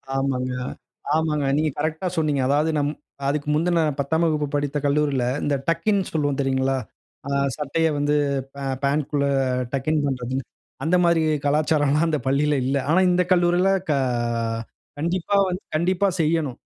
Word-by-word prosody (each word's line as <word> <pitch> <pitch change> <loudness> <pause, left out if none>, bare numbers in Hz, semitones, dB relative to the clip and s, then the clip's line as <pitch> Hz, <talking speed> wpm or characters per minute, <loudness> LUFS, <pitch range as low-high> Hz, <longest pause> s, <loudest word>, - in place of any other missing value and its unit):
ஆமாங்க. 130 -2 -1 0.6
ஆமாங்க. 155 -2 0
நீங்க 155 +1 +1
கரெக்ட்டா 155 +4 -1
சொன்னீங்க. 150 -4 +1
அதாவது 150 +3 +2
நம் 145 +1 0 0.3
அதுக்கு 145 +1 -1
முந்தின, 170 +2 +2 0.2
10ஆம் 160 +4 +1
வகுப்பு 150 -2 0
படித்த 145 0 -1
கல்லூரியில, 145 -2 +1 0.2
இந்த 145 - +1
டக்கின் 180 +5 +2
சொல்வோம் 145 -3 0
தெரியுங்களா? 135 0 +1 0.5
ஆ - - -3 0.2
சட்டைய 155 +2 0
வந்து 145 +1 +1 0.4
பா 140 - -8 0.2
பாண்ட்குள்ள 140 0 0 0.5
டக்-இன் 145 +3 0
பண்றதுன்னு, 130 -1 -2 0.4
அந்த 165 +4 +2
மாரி 170 -1 +3 0.2
கலாச்சாரம்ல்லாம் 150 +1 +2
அந்த 150 - 0
பள்ளியில 145 +2 +2
இல்லை. 135 0 +1
ஆனா 170 +4 +4
இந்த 180 0 +3
கல்லூரில 175 +2 +3 0.2
க 150 - +4 1.1
கண்டிப்பா 175 +4 -1
வந்து 180 +2 -4
கண்டிப்பா 185 +4 +2
செய்யனும். 155 -5 0
150 Hz, 135 wpm, -23 LUFS, 140-165 Hz, 1.1 s, ஆனா